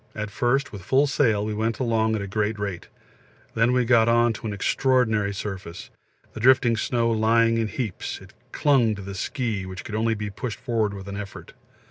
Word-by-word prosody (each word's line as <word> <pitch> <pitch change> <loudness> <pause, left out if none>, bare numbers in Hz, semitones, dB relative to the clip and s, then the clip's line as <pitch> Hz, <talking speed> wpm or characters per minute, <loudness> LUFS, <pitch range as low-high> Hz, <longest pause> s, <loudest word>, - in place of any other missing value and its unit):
At 105 -1 -4
first 130 +6 0
with 100 - -8
full 135 +10 +3
sail 115 -7 +1
we 110 - -2
went 110 +1 -1
along 110 -3 +1
at 105 - -2
a - - -5
great 105 +2 -1
rate; 100 -4 -5 0.7
then 115 +2 +2
we 125 -1 +2
got 115 -1 +4
on 120 0 +3
to 110 - -7
an - - -3
extraordinary 110 -1 +1
surface, 95 -3 -7 0.4
the - - -7
drifting 125 0 +4
snow 115 +1 0
lying 115 +1 +3
in 110 - 0
heaps; 110 -2 -4
it - - -15 0.2
clung 125 -7 +3
to 100 - -8
the 100 +1 -7
ski, 110 +1 -3
which 95 -1 -7
could 110 - -8
only 110 +1 +1
be 105 -1 -5
pushed 115 +2 -5
forward 110 -5 -1
with 95 0 -9
an 100 0 -5
effort. 100 -1 -8
110 Hz, 200 wpm, -24 LUFS, 105-120 Hz, 0.7 s, got